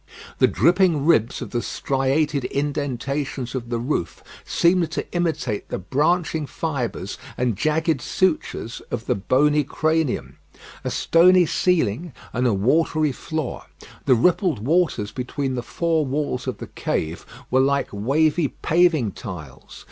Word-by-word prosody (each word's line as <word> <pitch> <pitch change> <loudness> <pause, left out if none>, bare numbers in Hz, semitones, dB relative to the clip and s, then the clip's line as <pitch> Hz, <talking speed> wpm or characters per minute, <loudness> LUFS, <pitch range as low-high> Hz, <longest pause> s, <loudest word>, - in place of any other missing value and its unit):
The - - +6
dripping 170 - +3
ribs 125 -8 +2
of - - -9
the 120 - -1
striated 140 +2 0
indentations 140 -2 -2
of 120 -3 -4
the 120 - -1
roof 120 - -3 0.2
seemed 170 -1 +2
to - - -2
imitate 160 - -1
the - - -2
branching 155 - 0
fibres 130 - -4 0.2
and 120 -3 0
jagged 160 - +1
sutures 155 - -1
of 110 - -4
the - - +2
bony 145 +9 +2
cranium. 155 - -1 0.4
A - - -2
stony 180 +2 +5
ceiling 165 - 0 0.2
and 125 +1 +1
a 115 - +2
watery 155 +7 +2
floor. 155 +1 -4 0.4
The 130 - +5
rippled 160 - +2
waters 155 - +1
between 130 +3 -3
the 125 - -2
four 165 +4 0
walls 135 -2 -2
of 130 - -2
the - - -7
cave 80 +2 -3 0.3
were 130 - +4
like 140 +1 +2
wavy 145 +9 +2
paving 160 - +2
tiles. 85 - -9
140 Hz, 135 wpm, -23 LUFS, 120-160 Hz, 0.4 s, The